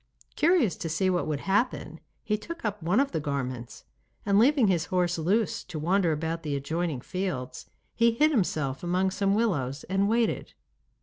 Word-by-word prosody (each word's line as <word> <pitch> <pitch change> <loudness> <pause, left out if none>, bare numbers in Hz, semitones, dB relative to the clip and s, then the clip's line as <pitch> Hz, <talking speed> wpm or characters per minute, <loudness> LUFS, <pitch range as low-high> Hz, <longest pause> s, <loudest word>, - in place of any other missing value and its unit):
Curious 305 - +3
to 165 - -4
see 185 +4 +1
what 175 -3 0
would 150 -2 -2
happen, 205 +6 -1 0.2
he 210 - 0
took 335 +8 -7
up 210 -1 -2
one 180 +8 +2
of 275 0 +1
the - - -1
garments, 130 -5 -4 0.4
and 200 0 +4
leaving 265 +1 +5
his 175 -3 +1
horse 175 -2 0
loose, 195 +6 0
to 165 - -7
wander 175 +3 +2
about 160 +2 -2
the 150 -3 -3
adjoining 155 0 -2
fields, 135 -8 -4 0.3
he 235 0 +4
hid 305 +6 +3
himself 155 - 0
among 185 +2 +1
some 195 +1 +1
willows 150 - 0
and 195 +2 0
waited. 230 0 0
180 Hz, 175 wpm, -27 LUFS, 155-210 Hz, 0.4 s, leaving